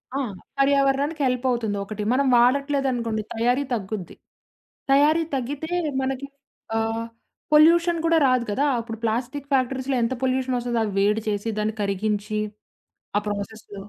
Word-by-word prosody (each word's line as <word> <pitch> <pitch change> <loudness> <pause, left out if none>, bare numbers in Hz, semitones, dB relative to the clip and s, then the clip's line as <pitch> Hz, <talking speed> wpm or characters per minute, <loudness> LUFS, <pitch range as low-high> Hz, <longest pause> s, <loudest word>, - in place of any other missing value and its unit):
ఆ! - - 0 0.4
పర్యావరణానికి 275 +2 +2
హెల్ప్ 250 0 -1
అవుతుంది 225 -4 -1
ఒకటి. 210 +1 -5
మనం 275 +1 +2
వాడట్లేదనుకోండి, 250 -3 +2
తయారీ 245 +4 +1
తగ్గుద్ది. 200 -5 -4 0.8
తయారీ 300 +4 +5
తగ్గితే 280 +5 -4 0.3
మనకి 265 +1 -3 0.5
ఆహ్, 225 +1 -1 0.5
పొల్యూషన్ 335 +2 +5
కూడా 330 0 +4
రాదు 255 -2 +2
కదా! 260 +7 0 0.2
అప్పుడు 225 -1 -6
ప్లాస్టిక్కు 250 +5 -2
ఫ్యాక్టరీస్‌లో 260 0 0
ఎంత 230 +3 0
పొల్యూషన్ 260 0 +1
వస్తదో. 240 -1 -1
అవి 210 -2 -3
వేడి 210 +2 +2
చేసి 205 +2 -2
దాన్ని 215 +1 -1
కరిగించి, 210 +1 -1 0.8
ఆ - - +4
ప్రాసెసు. 205 +1 -6
245 Hz, 130 wpm, -24 LUFS, 220-275 Hz, 0.8 s, తయారీ